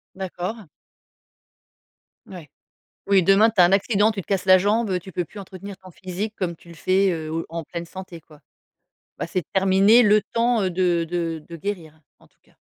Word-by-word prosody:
D'accord. 190 +2 -5 1.6
Ouais. 165 -7 -11 0.6
Oui, 195 -2 +4
demain, 195 +5 +5
tu 210 - 0
as - - +8
un 175 - +3
accident, 205 +2 +3
tu 200 - -5
te - - -12
casses 195 -2 -1
la 185 0 +7
jambe, 210 +2 +1
heu, 180 - 0
tu 185 +1 -12
peux 175 - -2
plus 205 - -13
entretenir 195 0 -9
ton 185 -1 -14
physique 190 +5 -6
comme 175 -3 -3
tu 170 - -20
le 170 - -12
fais, 190 +4 +2
heu, 160 0 -4
en 165 0 -5
pleine 170 +3 -6
santé, 185 -2 -10
quoi. 150 -1 -19 0.8
Bah, - - -4
c'est 180 -1 -2
terminé 195 +5 +5
le 210 0 +4
temps, 235 -1 0
heu, 185 - 0
de 175 -1 +1
de 165 -3 -3
de 170 - -9
guérir, 160 -5 -6 0.2
en - - -22
tout - - -39
cas. - - -29
185 Hz, 200 wpm, -23 LUFS, 170-200 Hz, 1.6 s, as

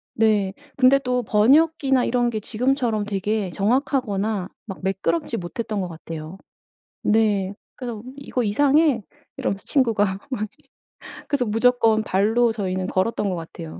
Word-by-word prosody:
네. 210 -4 +2 0.2
근데 265 +1 +6
또 250 -1 0
번역기나 270 +4 +3
이런 245 0 +1
게 220 - -2
지금처럼 235 -1 0
되게 205 -1 -1
정확하거나 215 - 0 0.2
막 195 -3 -7
매끄럽지 185 -3 -1
못했던 210 +4 -4
것 185 - -2
같아요. 165 +1 -8 0.7
네. 205 -3 +2 0.2
그래서 235 -5 -6
"이거 270 -2 -3
이상해." 280 +4 +3 0.3
이러면서 195 0 -3
친구가 230 -7 +2 0.3
막 250 -6 -3 0.9
그래서 275 -4 0
무조건 225 0 +3
발로 220 +5 +2
저희는 185 -4 -2
걸었던 200 +2 0
것 185 - -1
같아요. 165 -1 -8
220 Hz, 300 characters per minute, -23 LUFS, 195-250 Hz, 0.9 s, 근데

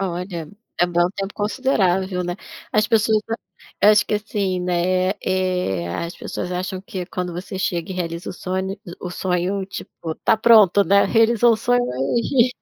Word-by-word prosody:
Olha, 175 -3 -4 0.3
é 175 - +5
bem 175 0 +2
um 180 - 0
tempo 195 0 -5
considerável, 190 -5 0
né. 175 0 -3 0.4
As 215 0 +3
pessoas, 220 -1 +3
ah 225 - 0 0.5
acho 215 - +4
que, - - 0
assim, 200 -3 -1
né, 180 +1 +1
eh, 180 - 0
as 170 - -4
pessoas 180 - -5
acham 185 +1 -3
que 190 -2 -6
quando 180 -1 -4
você 185 +2 -6
chega 175 -1 -2
e - - -4
realiza 170 -1 -4
o - - -6
sonho, 190 +2 -3
hum, 175 - -7
o 180 - -5
sonho, 185 +2 -1
tipo, 165 -4 -7
tá - - +4
pronto, 215 -3 +6
né. 200 +1 +4
"Realizou 230 +1 +4
o - - +1
sonho 245 +2 +2
aí, 235 - +1
185 Hz, 175 wpm, -21 LUFS, 180-210 Hz, 0.5 s, pronto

